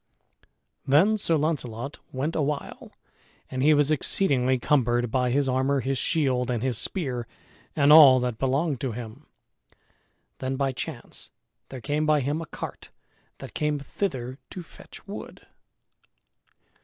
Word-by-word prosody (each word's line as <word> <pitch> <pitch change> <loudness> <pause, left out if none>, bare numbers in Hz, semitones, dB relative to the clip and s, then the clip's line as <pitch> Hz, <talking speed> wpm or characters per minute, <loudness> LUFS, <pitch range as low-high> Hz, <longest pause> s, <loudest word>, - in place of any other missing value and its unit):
Then 165 +11 +4
Sir 170 -6 +1
Launcelot 140 -4 -3
went 140 +5 -3
awhile 150 -2 -3 0.6
and 130 - -3
he 150 +2 +5
was 145 0 +2
exceedingly 130 -4 +2
cumbered 120 -3 +1
by 125 -1 +1
his 140 +2 +1
armor, 130 +2 +1
his 135 +1 -1
shield, 130 -6 0
and 120 -2 -1
his 130 -2 0
spear, 125 -10 -2 0.5
and 145 0 +5
all 140 -5 +9
that 125 -3 -3
belonged 135 +1 0
to 130 -4 -2
him. 120 +5 -9 1.1
Then 130 0 -2
by 135 0 0
chance 130 - -7 0.4
there 130 -2 -8
came 150 +6 -1
by 150 -1 +3
him 145 +5 -2
a 165 - -7
cart - - -8 0.5
that - - -10
came 150 -1 0
thither 135 -4 -4
to 180 - -8
fetch - - -15
wood. - - -9
135 Hz, 140 wpm, -26 LUFS, 125-150 Hz, 1.1 s, all